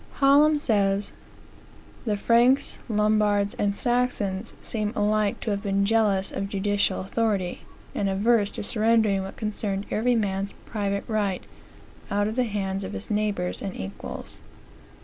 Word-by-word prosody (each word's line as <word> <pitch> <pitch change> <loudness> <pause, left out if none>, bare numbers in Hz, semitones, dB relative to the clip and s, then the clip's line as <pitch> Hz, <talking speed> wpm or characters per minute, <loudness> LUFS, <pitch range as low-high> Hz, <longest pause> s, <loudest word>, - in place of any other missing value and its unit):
Hallam 290 +2 +5
says: 200 -6 +1 0.9
"The 210 -3 0
Franks, 240 +5 +3
Lombards, 210 -1 +2
and 200 -1 +1
Saxons 230 -4 -1
seem 215 -2 -3
alike 210 0 +1
to 220 - -2
have 200 0 -1
been 200 -1 +1
jealous 205 -3 +2
of 195 - -3
judicial 200 -1 0
authority; 195 -2 -1 0.3
and 200 - 0
averse 205 +2 +3
to - - -3
surrendering 220 -2 +2
what 190 0 -7
concerned 205 -2 -2
every 245 +3 +2
man's 200 -2 -1
private 200 -2 -2
right, 205 -4 -1 0.7
out 205 0 +1
of 220 - -3
the 255 -1 +2
hands 195 -3 -2
of - - -6
his 95 - -6
neighbors 205 -4 -1
and 195 -2 -4
equals." 95 +2 -6
205 Hz, 140 wpm, -25 LUFS, 195-220 Hz, 0.9 s, Hallam